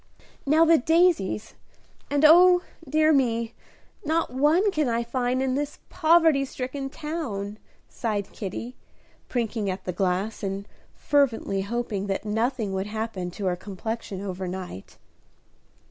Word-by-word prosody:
"Now 315 +3 +5
the 330 0 +5
daisies; 320 - +2 0.6
and 285 +1 +3
oh, 355 +3 +7 0.3
dear 310 +2 +4
me, 235 -4 +1 0.5
not 320 -3 0
one 315 +10 +3
can 305 -7 0
I 235 0 0
find 250 +2 -1
in 260 -1 0
this 290 +2 -2
poverty 325 -4 +4
stricken 270 +1 -5
town," 245 -11 -5 0.3
sighed 210 -4 -3
Kitty, 230 +5 -6 0.5
prinking 225 -4 -1
at 185 +1 -4
the 180 - -3
glass, 190 +4 -1
and 195 0 -4 0.3
fervently 240 -9 +1
hoping 205 -1 -3
that 195 +2 -2
nothing 220 -1 -1
would 190 +1 -2
happen 215 -4 -4
to 195 +3 -6
her 180 -1 +1
complexion 200 +1 -5
over 190 -2 -4
night. 180 - -7
235 Hz, 130 wpm, -25 LUFS, 200-295 Hz, 0.6 s, oh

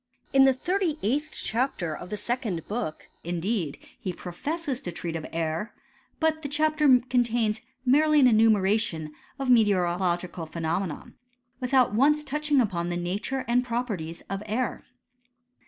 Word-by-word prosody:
In 270 0 +7
the 270 - +5
thirty 355 +2 0
eighth 290 +8 0
chapter 220 - -2
of 180 - -9
the 210 - -3
second 220 - -3
book, 210 -8 -4 0.2
indeed, 175 -1 -2 0.2
he 185 - -3
professes 275 - -4
to 175 - -5
treat 170 0 -5
of 160 - -4
air; 165 +6 -2 0.4
but 315 -1 +1
the 285 - -5
chapter 300 -3 +4
contains 235 -3 +1 0.2
merely 300 +4 +5
an 270 - +6
enumeration 215 -8 +3 0.2
of 270 -2 0
me 235 -3 +7
teorological 175 -3 0
phenomena, 165 +1 -3 0.5
without 255 -3 +3
once 300 +6 +3
touching 300 0 +1
upon 180 -8 0
the 175 0 -2
nature 205 +10 -2
and 245 +1 +3
properties 220 -10 -3
of 195 0 -4
air. 235 +4 -2
225 Hz, 140 wpm, -27 LUFS, 175-270 Hz, 0.5 s, In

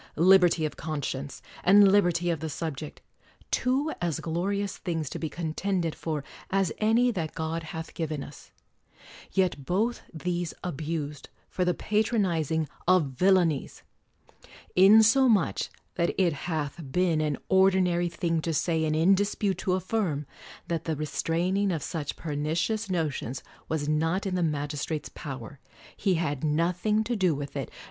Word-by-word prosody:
Liberty 175 -1 +5
of 155 - -4
conscience, 145 -3 -4 0.2
and 200 +1 +7
liberty 175 -3 +3
of 165 - -2
the 160 - -4
subject, 150 -1 -5 0.3
— - - -30
two 270 +5 +1
as 170 -4 -1
glorious 195 +5 -2
things 160 -6 -3
to - - -5
be 160 - -3
con 160 +1 -4
tended 180 -3 -1
for 155 -3 -3 0.3
as 195 -3 +1
any 230 +3 +3
that 165 -8 -4
God 160 +1 -2
hath 160 0 -7
given 155 -3 -3
us; 145 - -13 0.8
yet 180 -7 +1
both 215 - 0
these 175 0 -3
abused 150 -3 -4 0.2
for 185 - 0
the 180 -1 +1
patronizing 180 - 0 0.2
of 175 -6 +4
villain 180 +3 +4
ies! 140 - -7 0.9
insomuch 220 +2 +5 0.2
that 170 +1 -1
it 175 -4 +3
hath 155 0 -3
been 175 -1 +2
an 150 -2 0
ordinary 185 -2 +3
thing 165 0 -1
to 165 0 -2
say, 160 0 +1
and 155 0 0
in 165 +5 +5
dispute 200 -1 0
to 185 -1 0
affirm, 185 -5 -1 0.4
"that 170 -1 -2
the 160 - -1
re 155 +1 -3
straining 185 +6 0
of 160 -5 -2
such 155 -5 -4
pernicious 165 +8 -2
notions 150 -7 -2 0.3
was 155 -2 -1
not 165 +6 +1
in 195 - -2
the 180 - 0
magistrate's 150 -1 -2
power; 135 -1 -8 0.4
he 190 -3 +1
had 145 -4 -2
nothing 180 +8 +1
to 235 +2 -2
do 185 -7 +2
with 140 0 -6
it. 135 -4 -3
170 Hz, 155 wpm, -27 LUFS, 155-190 Hz, 0.9 s, and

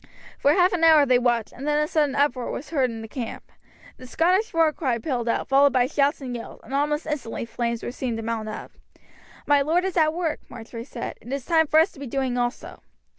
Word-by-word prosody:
For 285 - +4
half 360 +2 +3
an 340 -2 -1
hour 315 -3 +7
they 255 -2 +4
watched, 240 -3 0
and 275 +3 -7
then 295 0 +2
a 300 - +1
sudden 295 -3 +1
uproar 280 -3 +1
was 295 - -6
heard 270 -5 +2
in 225 -1 -7
the - - -7
camp. 230 +1 -7 0.5
The 255 - -11
Scottish 365 - +1
war 325 -2 +3
cry 260 -7 -1
pealed 240 -1 -2
out, - - -1
followed 275 +1 +4
by 250 -2 +3
shouts 285 +2 +1
and 250 -2 -5
yells, 230 - -8
and - - -10
almost 295 +2 0
instantly 275 -7 -4
flames 235 0 -3
were - - -4
seen 245 -2 -3
to 225 - -5
mount 220 -1 -3
up. 215 - -7 0.7
"My 290 -1 +4
lord 330 +6 +1
is 380 -2 -2
at 310 -2 +4
work," 335 -3 -1
Marjory 230 +1 -8
said, 240 -3 -7
"it 240 - -10
is 275 -2 -3
time 320 -2 +3
for 310 - +5
us 330 +5 +3
to - - -16
be 280 - -6
doing 260 0 -1
also." 245 +1 -3
275 Hz, 235 wpm, -24 LUFS, 240-310 Hz, 0.7 s, hour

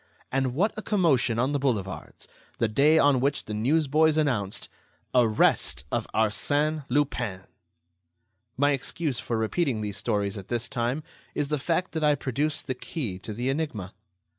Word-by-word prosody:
And 130 -1 0
what 200 +8 +2
a 215 - -4
commotion 160 - +2
on 130 +4 +1
the 145 - 0
boulevards, 105 -9 -3 0.3
the 115 - +2
day 140 +8 +4
on 145 -4 +5
which 140 +2 0
the 105 - -5
newsboys 155 +6 +3
announced: 115 -10 0 0.5
"Arrest 105 - +3
of - - -1
Arsène 145 +7 +1
Lupin!" 120 -10 0 1.2
My 145 +2 +4
excuse 140 0 -2
for 115 - -2
repeating 115 +1 0
these 105 -1 -4
stories 100 -2 -1
at 95 - -11
this 120 0 -1
time 125 +3 -1 0.3
is 145 -1 -1
the 150 -1 0
fact 170 +5 0
that 160 -1 -2
I 150 -1 +4
produce 145 +3 -2
the 130 - -2
key 125 - -5
to 110 - -7
the 120 +5 -2
enigma. 135 - -3
130 Hz, 160 wpm, -27 LUFS, 110-150 Hz, 1.2 s, on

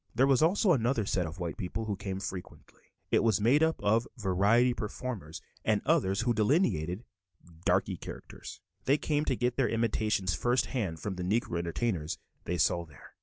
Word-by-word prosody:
There 130 +4 +5
was 135 -2 +4
also 180 +4 +4
another 120 -4 +1
set 90 -3 0
of 80 +1 -8
white 85 -2 -4
people 110 +2 -4
who 105 -2 -2
came 95 0 -4
frequently; 95 -2 -8 0.3
it - - +4
was 110 -4 +3
made 125 +8 +4
up 160 0 +2
of 110 +3 +2
variety 105 +5 +3
performers 105 -7 -5 0.2
and - - +2
others 95 +2 +2
who 120 0 +1
delineated 105 - +1 0.6
"darky 95 0 +2
characters"; - - -9 0.2
they 140 +3 +4
came 150 0 0
to 130 - +1
get 120 0 -1
their 135 -3 +2
imitations 105 -4 0
first 120 +9 +1
hand 95 - -3
from 100 -3 -4
the 90 - -3
Negro 95 -2 0
entertainers 85 -1 -2 0.3
they 90 - -1
saw 85 0 +2
there. 75 -4 -16
105 Hz, 175 wpm, -30 LUFS, 90-125 Hz, 0.6 s, There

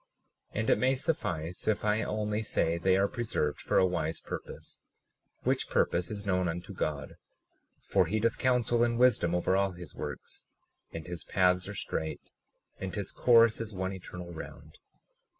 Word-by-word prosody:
37:12 - - 0
And 110 - -1
it - - +4
may 130 +1 +3
suffice 95 - -2
if 105 -1 +1
I 105 +1 +2
only 105 0 -1
say 85 -5 +1
they 95 +2 +3
are 100 +1 +3
preserved 105 - -2
for - - +1
a 95 - +6
wise 85 -3 -1
purpose, - - -7 0.6
which - - 0
purpose 90 +1 +1
is 105 -1 -5
known 90 -2 +1
unto 85 +1 -4
God; 75 -1 -3 0.7
for 90 - +2
he 110 +6 0
doth 115 +1 +1
counsel 120 -2 +3
in 120 -1 +1
wisdom 115 -9 +4
over 90 +1 +2
all 100 -1 +2
his 90 -3 -9
works, - - -7 0.4
and 80 -1 -6
his 90 -1 -6
paths 90 -1 +2
are 105 - -6
straight, 80 -4 -4 0.5
and 95 -1 -4
his 100 -2 -3
course 115 -2 +5
is 110 -2 -6
one 95 +1 -2
eternal 90 -2 -8
round. 80 - -10
95 Hz, 170 wpm, -30 LUFS, 90-110 Hz, 0.7 s, a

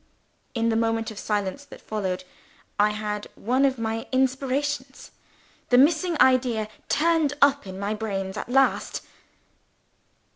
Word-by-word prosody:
In 230 0 +1
the 225 - +1
moment 225 0 0
of 210 - -8
silence 205 +4 -2
that - - -12
followed, 190 -4 -3 0.6
I 210 +1 +5
had 210 0 -4
one 255 +5 +1
of 265 -1 +1
my 225 0 -3
inspirations. 265 +1 -1 0.6
The 245 - +5
missing 320 +4 +3
idea 245 -4 +3 0.2
turned 320 -2 +2
up 280 -5 +4
in 190 0 -7
my 200 +2 -2
brains 195 -3 -3
at 215 - -5
last. 270 +1 +2
230 Hz, 135 wpm, -25 LUFS, 210-270 Hz, 0.6 s, I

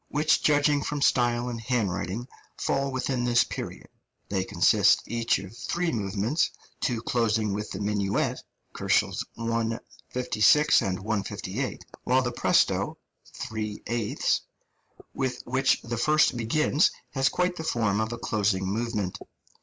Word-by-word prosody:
which, 150 +1 +2
judging 145 -1 +3
from 145 +1 -3
style 120 -3 +2
and 120 -2 -4
handwriting, 110 -1 -2 0.3
fall 135 0 0
within 130 -1 -1
this 120 -1 +4
period. - - -7 0.4
They 95 -2 0
consist - - +4
each 115 0 +1
of 100 +2 -9
three 175 +6 -1
movements, 110 - 0 0.3
two 120 -4 -1
closing 110 -4 +1
with 105 +1 -4
the - - -5
minuet 100 -1 0 0.3
(156, 115 0 -1 1.0
158, 100 +2 -3
K.), - - -2 0.3
while 130 +1 +3
the 125 - -1
presto, 120 - +2 0.3
3 110 -1 -5
8, 115 -2 0 0.7
with 130 -2 -2
which 135 +2 +2
the 120 0 -4
first 155 +3 +3
begins 140 +7 +2 0.2
has 135 0 +2
quite 180 0 0
the 160 - -4
form 110 -8 +1
of 110 +1 -2
a 120 - -4
closing 100 -4 0
movement. 105 -1 -2
115 Hz, 130 wpm, -27 LUFS, 105-130 Hz, 1.0 s, this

